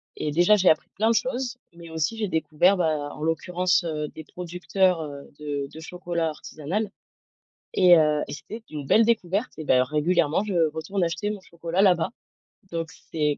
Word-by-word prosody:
et 150 Hz, -, -2 dB
déjà, 175 Hz, +7 st, +5 dB
j'ai 190 Hz, -2 st, +4 dB
appris 155 Hz, -, +2 dB
plein 220 Hz, +3 st, +2 dB
de 230 Hz, -, +3 dB
choses, 250 Hz, 0 st, -1 dB, 0.2 s
mais 170 Hz, -1 st, -12 dB
aussi 160 Hz, +7 st, -1 dB
j'ai 210 Hz, -3 st, -1 dB
découvert 160 Hz, +4 st, +2 dB
ben, 155 Hz, -4 st, 0 dB
en 150 Hz, -, -8 dB
l'occurrence, 180 Hz, +3 st, +1 dB
heu, 155 Hz, -2 st, -2 dB
des 160 Hz, -, -10 dB
producteurs, 180 Hz, +1 st, 0 dB
heu, 145 Hz, -2 st, -8 dB
de 145 Hz, -2 st, -3 dB
de 160 Hz, -, -9 dB
chocolat 170 Hz, -1 st, -2 dB
artisanal 160 Hz, +7 st, -4 dB, 0.8 s
et 180 Hz, -2 st, +7 dB
heu 150 Hz, -1 st, +3 dB
et -, -, -6 dB
c'était 155 Hz, +10 st, -8 dB
une 150 Hz, -3 st, -6 dB
belle 225 Hz, +10 st, +5 dB
découverte 215 Hz, 0 st, 0 dB
et 155 Hz, -, -5 dB
d'ailleurs 130 Hz, -3 st, +3 dB
régulièrement, 160 Hz, +3 st, +2 dB
je 175 Hz, -7 st, +2 dB
retourne 175 Hz, +4 st, -2 dB
acheter 170 Hz, +5 st, -2 dB
mon 210 Hz, -1 st, -4 dB
chocolat 170 Hz, 0 st, -2 dB
là-bas, 180 Hz, -4 st, +4 dB, 0.6 s
donc 165 Hz, -1 st, -3 dB, 0.2 s
c'est 150 Hz, -2 st, +1 dB
170 Hz, 180 wpm, -25 LUFS, 155-190 Hz, 0.8 s, et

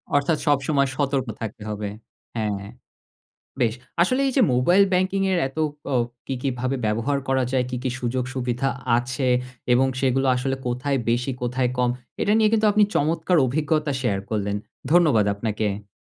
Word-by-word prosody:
অর্থাৎ 145 Hz, +2 st, +2 dB
সবসময় 140 Hz, -1 st, +2 dB
সতর্ক 140 Hz, -3 st, 0 dB
থাকতে 110 Hz, -1 st, -6 dB
হবে 105 Hz, -1 st, -3 dB, 0.5 s
হ্যাঁ 100 Hz, -2 st, -2 dB, 0.9 s
বেশ! 115 Hz, -2 st, +2 dB, 0.3 s
আসলে 255 Hz, +9 st, +2 dB
এই -, -, -1 dB
যে 260 Hz, -, +5 dB
মোবাইল 175 Hz, +11 st, +4 dB
ব্যাংকিং 185 Hz, +2 st, +1 dB
এর 180 Hz, -, +2 dB
এত 135 Hz, -, -11 dB, 0.4 s
ও -, -, +4 dB, 0.3 s
কি, 135 Hz, -, -2 dB
কি 140 Hz, -, 0 dB
ভাবে 130 Hz, +1 st, 0 dB
ব্যবহার 115 Hz, +7 st, 0 dB
করা 130 Hz, -1 st, +2 dB
যায়, 130 Hz, -1 st, +2 dB
কি, 125 Hz, -, -2 dB
কি 130 Hz, -, -1 dB
সুযোগ 125 Hz, +1 st, -1 dB
সুবিধা 125 Hz, +1 st, -1 dB, 0.3 s
আছে? 125 Hz, +1 st, -1 dB, 0.4 s
এবং 130 Hz, +2 st, +4 dB
সেগুলো 135 Hz, 0 st, +2 dB
আসলে 135 Hz, +1 st, -1 dB
কোথায় 130 Hz, +3 st, 0 dB
বেশি 125 Hz, +3 st, 0 dB
কোথায় 125 Hz, 0 st, 0 dB
কম? 125 Hz, -1 st, +3 dB, 0.3 s
এটা 205 Hz, -, +2 dB
নিয়ে 215 Hz, -1 st, +4 dB
কিন্তু 220 Hz, -1 st, +3 dB
আপনি 210 Hz, 0 st, +5 dB
চমৎকার 160 Hz, +4 st, +1 dB
অভিজ্ঞতা 150 Hz, +2 st, 0 dB
শেয়ার 100 Hz, -5 st, 0 dB
করলেন। 100 Hz, -1 st, -1 dB, 0.4 s
ধন্যবাদ 155 Hz, -, +5 dB
আপনাকে। 105 Hz, -1 st, -3 dB
130 Hz, 160 wpm, -23 LUFS, 120-150 Hz, 0.9 s, যে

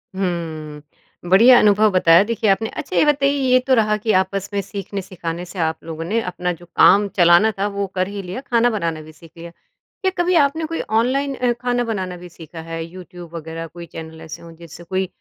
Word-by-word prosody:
हम्म। 160 Hz, -4 st, -6 dB
बढ़िया 235 Hz, +7 st, +7 dB
अनुभव 210 Hz, +1 st, +4 dB
बताया 175 Hz, -1 st, +5 dB
देखिए 220 Hz, -1 st, -1 dB
आपने। 220 Hz, +3 st, +1 dB
अच्छा 280 Hz, -, -6 dB
ये -, -, +5 dB
बताइए 280 Hz, -1 st, +2 dB, 0.2 s
ये 255 Hz, -, +6 dB
तो 265 Hz, -, +4 dB
रहा 215 Hz, -2 st, +2 dB
कि 215 Hz, +1 st, -1 dB
आपस 195 Hz, 0 st, -4 dB
में 200 Hz, -, 0 dB
सीखने-सिखाने 185 Hz, -4 st, -6 dB
से 180 Hz, +1 st, -9 dB
आप 160 Hz, -1 st, -1 dB
लोगों 165 Hz, 0 st, -6 dB
ने 220 Hz, +6 st, 0 dB
अपना 180 Hz, 0 st, -2 dB
जो 175 Hz, +1 st, -14 dB
काम 205 Hz, +1 st, +5 dB
चलाना 175 Hz, +5 st, +5 dB
था 200 Hz, -, +1 dB
वो 200 Hz, -, 0 dB
कर 185 Hz, 0 st, 0 dB
ही 200 Hz, 0 st, -6 dB
लिया 185 Hz, +7 st, -6 dB
खाना 240 Hz, -3 st, +2 dB
बनाना 170 Hz, -8 st, -3 dB
भी 155 Hz, 0 st, -13 dB
सीख 160 Hz, +1 st, -17 dB
लिया। 170 Hz, 0 st, -9 dB
क्या 400 Hz, -, -7 dB
कभी 350 Hz, +1 st, +2 dB
आपने 315 Hz, +3 st, -3 dB
कोई 330 Hz, +1 st, -3 dB, 0.2 s
ऑनलाइन 275 Hz, +3 st, 0 dB
अ, 250 Hz, -1 st, 0 dB
खाना 245 Hz, 0 st, 0 dB
बनाना 190 Hz, -6 st, -4 dB
भी 180 Hz, 0 st, -11 dB
सीखा 165 Hz, -1 st, -11 dB
है? 165 Hz, 0 st, -6 dB
यूट्यूब 175 Hz, -1 st, -12 dB
वग़ैरह 165 Hz, 0 st, -6 dB
कोई 170 Hz, +2 st, -10 dB
चैनल 160 Hz, -1 st, -10 dB
ऐसे 160 Hz, +1 st, -9 dB
हो 170 Hz, -, -12 dB
जिससे 170 Hz, 0 st, -13 dB
कोई 190 Hz, +2 st, -2 dB
185 Hz, 210 wpm, -20 LUFS, 165-225 Hz, 0.2 s, बढ़िया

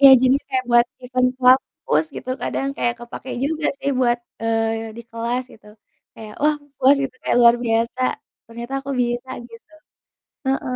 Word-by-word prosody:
Iya 275 Hz, -1 st, +10 dB
jadinya 260 Hz, +2 st, +3 dB
kayak 255 Hz, -1 st, 0 dB
buat 240 Hz, 0 st, +6 dB, 0.2 s
event 255 Hz, 0 st, +2 dB
kampus 250 Hz, -, +3 dB
gitu, 255 Hz, -, -6 dB
kadang 270 Hz, -, -2 dB
kayak 240 Hz, 0 st, 0 dB
kepake 240 Hz, +2 st, -8 dB
juga 310 Hz, +1 st, -1 dB
sih 280 Hz, -, -1 dB
buat, 240 Hz, -1 st, +3 dB, 0.2 s
eee, 225 Hz, 0 st, 0 dB
di -, -, -7 dB
kelas 235 Hz, +2 st, -2 dB
gitu, 215 Hz, -, -18 dB, 0.5 s
kayak 215 Hz, -1 st, -10 dB
wah 300 Hz, 0 st, +4 dB, 0.2 s
puas 275 Hz, +2 st, +5 dB
itu 255 Hz, -, -6 dB
kayak -, -, +1 dB
luar 235 Hz, 0 st, +8 dB
biasa 230 Hz, +2 st, 0 dB, 0.5 s
ternyata 235 Hz, +3 st, -7 dB
aku 280 Hz, -, -6 dB
bisa 240 Hz, +1 st, -1 dB, 0.2 s
gitu. 230 Hz, +7 st, -15 dB, 0.7 s
Heeh. 265 Hz, -1 st, -1 dB
245 Hz, 160 wpm, -21 LUFS, 230-260 Hz, 0.7 s, Iya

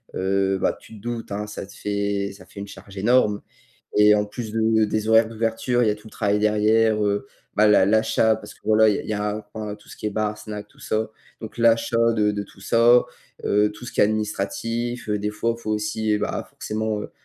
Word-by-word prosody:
heu, 95 Hz, +1 st, +1 dB
bah, -, -, +1 dB
tu 110 Hz, -, -14 dB
te 105 Hz, -, -13 dB
doutes, 120 Hz, -1 st, -5 dB
hein, 105 Hz, +1 st, -3 dB
ça 105 Hz, -1 st, -7 dB
te -, -, -14 dB
fait 100 Hz, -1 st, -2 dB
ça 100 Hz, -1 st, -15 dB
fait 100 Hz, -, -10 dB
une 100 Hz, -, -6 dB
charge 100 Hz, 0 st, -12 dB
énorme 105 Hz, 0 st, +3 dB, 0.6 s
et 105 Hz, 0 st, +7 dB
en 105 Hz, 0 st, +1 dB
plus 110 Hz, +1 st, -6 dB
de 110 Hz, 0 st, +3 dB
des 110 Hz, +1 st, -2 dB
horaires 110 Hz, 0 st, +5 dB
d'ouverture, 115 Hz, +2 st, 0 dB
il 115 Hz, -, +3 dB
y -, -, +4 dB
a -, -, 0 dB
tout 105 Hz, +1 st, -14 dB
le -, -, -20 dB
travail 105 Hz, -1 st, +1 dB
derrière, 105 Hz, +1 st, +3 dB
heu, 100 Hz, +5 st, 0 dB, 0.3 s
bah, 105 Hz, -, +4 dB
l'a 100 Hz, -2 st, +5 dB
l'achat 110 Hz, +1 st, +3 dB
parce -, -, -11 dB
que, -, -, -26 dB
voilà, 110 Hz, 0 st, +5 dB
il 100 Hz, -, -2 dB
y 110 Hz, -, -2 dB
a 105 Hz, 0 st, -1 dB
aura 105 Hz, -1 st, -10 dB, 0.2 s
ben, 105 Hz, -, -5 dB
tout 105 Hz, -, -21 dB
ce -, -, -11 dB
qui -, -, -13 dB
est -, -, 0 dB
bar, 105 Hz, 0 st, -1 dB
snack, 105 Hz, -1 st, -8 dB
tout -, -, -23 dB
ça, 110 Hz, 0 st, -1 dB, 0.3 s
donc 110 Hz, +1 st, -8 dB
l'achat 115 Hz, 0 st, +3 dB
de 105 Hz, -2 st, +2 dB
de 100 Hz, 0 st, -3 dB
tout 95 Hz, -, -16 dB
ça, 120 Hz, +4 st, +5 dB, 0.4 s
heu, 105 Hz, +1 st, +3 dB
tout 120 Hz, +3 st, -11 dB
ce -, -, -7 dB
qui -, -, 0 dB
est -, -, +7 dB
administratif, 110 Hz, +3 st, -2 dB
des 105 Hz, 0 st, -1 dB
fois 115 Hz, +2 st, -1 dB
il -, -, -15 dB
faut 110 Hz, -, -3 dB
aussi, 105 Hz, 0 st, 0 dB
bah, -, -, -3 dB
forcément, 110 Hz, 0 st, -3 dB
heu, -, -, -7 dB
105 Hz, 235 wpm, -23 LUFS, 105-110 Hz, 0.6 s, et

